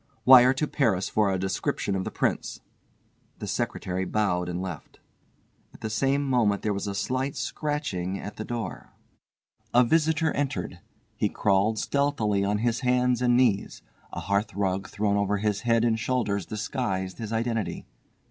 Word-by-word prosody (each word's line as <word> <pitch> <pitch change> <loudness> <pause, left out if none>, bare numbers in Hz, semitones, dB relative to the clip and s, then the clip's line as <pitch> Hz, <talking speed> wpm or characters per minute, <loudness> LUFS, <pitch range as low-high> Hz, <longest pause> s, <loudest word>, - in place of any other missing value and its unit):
"Wire 130 -1 +9
to 150 - 0
Paris 110 -12 +1
for 105 -2 +2
a 95 - 0
description 95 +1 -1
of 95 - -2
the - - -2
Prince." - - -2 0.8
The - - -6
secretary 95 0 -2
bowed 90 -3 0
and 90 0 -3
left. 90 -4 -7 0.8
At - - -16
the 110 - -3
same 135 +6 +1
moment 115 -6 +2
there 105 - +1
was 100 - -3
slight 130 +6 -1
scratching 100 - -3
at 105 - -8
the 110 - -4
door. 115 -5 -6 0.8
A 125 - +7
visitor 160 +4 +2
entered. 140 -10 -3 0.4
He - - +1
crawled 100 +2 +1
stealthily 115 -8 0
on 100 +1 +1
his 115 +2 0
hands 125 -1 +2
and 120 -1 +4
knees. 115 -6 +1 0.3
A - - -5
hearthrug 100 -1 -1
thrown 100 -1 0
over 100 0 +1
his 105 0 -1
head 115 -1 +2
and 115 -1 +1
shoulders 105 -6 -1
disguised 105 -4 -3
his 110 -2 -5
identity. 115 -1 -2
110 Hz, 155 wpm, -26 LUFS, 100-125 Hz, 0.8 s, Wire